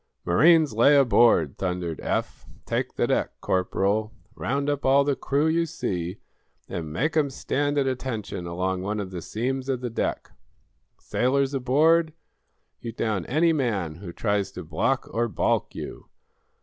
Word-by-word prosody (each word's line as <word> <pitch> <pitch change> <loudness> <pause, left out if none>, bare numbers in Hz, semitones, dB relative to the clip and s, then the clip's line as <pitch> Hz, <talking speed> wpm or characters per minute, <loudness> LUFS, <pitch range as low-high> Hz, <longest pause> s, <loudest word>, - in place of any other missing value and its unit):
"Marines, 155 - +5
lay 120 +7 +5
aboard," 115 - +4
thundered 90 -4 -2
Eph. - - -3 0.2
"Take - - -2
the - - +1
deck, - - -1
Corporal. 100 +3 0 0.2
Round 140 +2 -2
up 145 -1 -1
all 135 +1 +5
the 140 -1 +1
crew 140 +4 0
you 165 +1 +2
see, 90 - -3 0.5
and 80 -3 -5
make 150 - -1
'em 150 -3 +2
stand 145 +2 -1
at 140 - +2
attention 115 -9 -3
along 90 +2 -2
one 105 +3 -2
of 95 -2 -5
the 90 -2 -5
seams 130 +7 -3
of 130 -2 0
the 125 -2 -3
deck! - - -2 0.7
Sailors 135 +2 0
aboard, 155 +5 +3 0.7
you 115 - -6
down 105 -6 -2
any 165 +5 +3
man 100 - -1
who 90 -1 -8
tries 100 +1 -1
to - - -7
block 105 - -1
or 120 +1 +1
balk 110 - 0
you. - - -7
120 Hz, 155 wpm, -25 LUFS, 95-140 Hz, 0.7 s, Marines